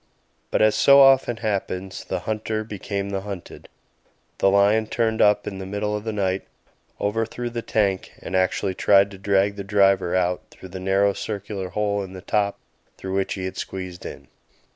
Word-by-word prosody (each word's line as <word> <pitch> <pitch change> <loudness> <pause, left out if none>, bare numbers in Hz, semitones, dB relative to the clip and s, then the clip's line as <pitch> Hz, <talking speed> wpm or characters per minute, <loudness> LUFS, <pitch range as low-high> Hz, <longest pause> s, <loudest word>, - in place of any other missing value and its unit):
But - - +2
as 110 -1 +5
so 140 0 +6
often 135 -3 +5
happens, 95 -4 -3
the - - -3
hunter 110 0 -2
became 100 -2 -4
the 95 -1 -2
hunted; 100 -3 -9 0.7
the 100 - +4
lion 100 +3 +3
turned 110 0 0
up 105 0 +4
in 95 -2 -5
the 95 - -6
middle 105 +1 -2
of 105 +1 -5
the 110 - -1
night, 95 -2 -1 0.6
overthrew 115 +3 -2
the 120 0 -3
tank 100 -4 0
and - - -5
actually 95 +1 +1
tried 100 +1 +4
to 95 - -11
drag 100 +1 +1
the 100 - -4
driver 95 -3 +3
out 90 -1 +1
through 95 - -13
the 95 +1 -7
narrow 95 +2 +2
circular 100 -3 -5
hole 100 +1 -1
in 95 -1 -7
the 95 - -8
top 100 +1 0 0.4
through 95 0 -5
which 95 0 -1
he 95 -1 -4
had 95 - -5
squeezed 95 -2 -6
in. 70 - -9
100 Hz, 185 wpm, -23 LUFS, 95-105 Hz, 0.7 s, so